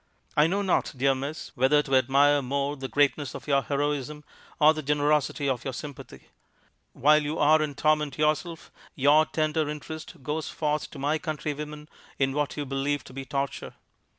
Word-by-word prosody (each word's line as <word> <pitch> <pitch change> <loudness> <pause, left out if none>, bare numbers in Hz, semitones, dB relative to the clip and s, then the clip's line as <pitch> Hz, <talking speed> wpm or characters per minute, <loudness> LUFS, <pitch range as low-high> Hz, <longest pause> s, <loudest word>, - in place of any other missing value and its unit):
'I 150 +1 +5
know 195 +4 0
not, 185 -3 +1
dear 135 +2 +3
miss, 140 +4 -6
whether 140 +3 +3
to 135 -2 0
admire 140 +3 +4
more 140 +2 -2
the 135 -1 -6
greatness 145 0 +1
of - - -9
your 140 -1 +3
heroism 145 +1 -2 0.4
or 155 +1 +6
the 155 - -4
generosity 145 0 +1
of 130 -3 -1
your 135 - -4
sympathy. 145 -1 -10 0.6
While 150 +3 +4
you 150 +2 -3
are 155 +1 +4
in 150 -2 -2
torment 150 -1 +1
yourself, 155 +2 -1 0.2
your 150 +3 +4
tender 155 -1 0
interest 150 -1 -8
goes 150 +4 -3
forth 150 -1 -2
to - - -11
my 145 +3 0
countrywomen 150 -1 -5 0.3
in 135 -1 +1
what 145 +1 -2
you 145 - -2
believe 135 +1 -1
to - - -13
be 135 0 -6
torture. 140 +1 -4
145 Hz, 175 wpm, -27 LUFS, 140-150 Hz, 0.6 s, or